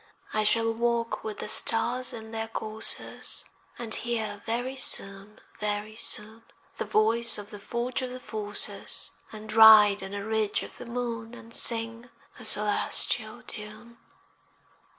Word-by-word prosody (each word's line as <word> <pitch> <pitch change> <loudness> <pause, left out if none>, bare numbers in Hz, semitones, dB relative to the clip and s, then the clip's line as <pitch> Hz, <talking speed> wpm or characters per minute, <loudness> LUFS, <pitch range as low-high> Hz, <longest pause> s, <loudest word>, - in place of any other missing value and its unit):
I 215 - +1
shall 225 +1 +2
walk 235 0 -1
with 215 -1 -5
the - - -5
stars 240 +4 +1
in 220 -1 -9
their 225 0 -3
courses, 220 -1 -2 0.3
And 230 -2 -3
hear 220 -3 -2
very 245 +4 -2
soon, 200 -4 +1 0.2
very 210 +1 -3
soon, 220 0 +3 0.4
The - - -3
voice 225 +2 +2
of 205 -1 -9
the 205 - -8
forge 240 +5 -2
of 255 - -3
the 255 +1 -7
Forces, 210 -3 -2 0.2
And 215 0 -8
ride 215 -2 +8
on 195 +1 -6
a 200 0 -5
ridge 220 -2 0
of - - -11
the 245 - -8
moon, 235 -1 -4
And 230 -1 -13
sing 230 +1 +1 0.3
a 225 - -8
celestial 210 -1 -1
tune. 215 +2 -9
220 Hz, 145 wpm, -27 LUFS, 210-235 Hz, 0.4 s, ride